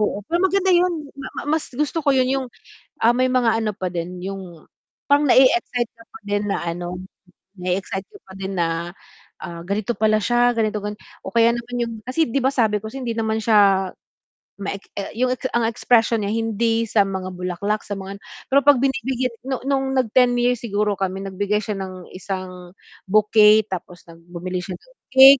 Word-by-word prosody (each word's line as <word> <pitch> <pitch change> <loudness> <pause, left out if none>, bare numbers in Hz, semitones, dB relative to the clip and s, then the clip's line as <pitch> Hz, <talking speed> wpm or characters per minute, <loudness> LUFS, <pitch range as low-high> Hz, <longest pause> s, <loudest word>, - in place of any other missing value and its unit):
oo. 205 -1 -1
Pero 340 +8 0
maganda 380 0 +3
'yun 345 -5 +1
ma 260 - -6
ma - - -3 0.2
mas - - -10
gusto 300 +3 0
ko 295 - -2
'yun 255 0 +3
'yung, 265 -1 -1 0.6
ah, 235 +2 +5
may 255 - +3
mga 240 -3 +3
ano 215 - 0
pa 185 -1 -3
din 180 +1 -5
'yung 185 -4 -7 0.4
pang 285 +1 +5
na-e-excite 255 -3 +4
ka 230 - -15
pa 335 - -10
din 205 0 0
na 200 - 0
ano 175 +1 -4 0.6
na-e-excite 185 +1 -2
ka 410 - -15
pa 190 - -14
din 195 0 -4
na, 170 +1 -1 0.5
ah, 170 -2 -7
ganito 205 +4 -1
pala 215 0 +3
siya 240 +2 +3
ganito 215 -1 0
gan 210 +1 -5 0.2
o - - -8
kaya 230 0 +5
naman 240 +1 -5
'yung 230 - -5 0.2
kasi 320 +5 +2
'di 275 +1 -1
ba 260 - +2
sabi 215 -4 +2
ko 220 - -7
hindi 250 -1 -4
naman 220 -1 -1
siya 195 -4 +4 0.7
ma 200 -1 -4
e 200 - -5 0.4
'yung 255 0 +2 0.2
ang 235 -1 +1
expression 230 -1 +2
niya 200 - -1
hindi 225 +1 0
sa 210 -1 +4
mga 190 -1 -4
bulaklak, 185 +4 -2
sa - - -14
mga 195 +1 -7
ano, 200 - -15 0.3
pero 275 +1 +5
'pag 285 -3 +6
binibigyan 260 -2 -1
nung 260 -1 -3
nung 270 -1 +1
nag 260 -2 +1
10 250 -1 +6
years 245 -1 +1
siguro 210 -1 0
kami 190 0 -2
nagbigay 205 +2 -1
siya 210 0 -4
ng 185 -2 -7
isang 185 -1 -6 0.3
bouquet 215 +1 +5
tapos 180 -2 -7
nag 165 - -13 0.2
bumili 180 +1 -4
siya 185 -1 -6
ng - - -24 0.2
cake. 265 +1 +9
215 Hz, 195 wpm, -22 LUFS, 190-255 Hz, 0.7 s, cake